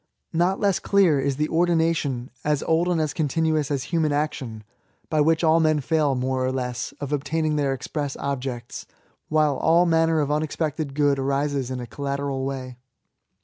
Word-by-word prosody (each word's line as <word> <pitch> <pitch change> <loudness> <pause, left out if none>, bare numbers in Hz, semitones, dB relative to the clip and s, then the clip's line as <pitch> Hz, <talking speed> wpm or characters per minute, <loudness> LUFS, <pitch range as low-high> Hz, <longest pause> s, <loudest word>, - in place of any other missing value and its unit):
Not 175 +4 +1
less 200 -3 +2
clear 185 -8 +3
is 135 0 0
the 150 0 +1
ordination^ 165 -7 +1
as 150 -1 0
old 165 +2 +2
and 175 -2 +1
as 155 -2 -1
continuous 155 -1 0
as 140 -3 -1
human 160 -3 +2
action^ 140 -7 -2 0.5
by 155 -1 +3
which 160 +2 +2
men 160 -1 +4
fail> 145 -1 +1
more 130 0 -1
or 130 - 0
less, 125 -2 -3
of 145 0 -4
obtaining 155 +2 0
their 145 -2 +1
express 140 +1 -4
objects, 130 -3 -4 0.4
while 155 -2 +2
all 170 +2 +4
manner 165 -1 +3
of 145 -1 0
unexpected 150 -1 -2
good 145 -2 +2
arises 140 -1 -1
in 130 -1 -4
a 120 - -5
collateral 140 +1 -3
way. 130 -2 -5
150 Hz, 165 wpm, -24 LUFS, 135-160 Hz, 0.5 s, men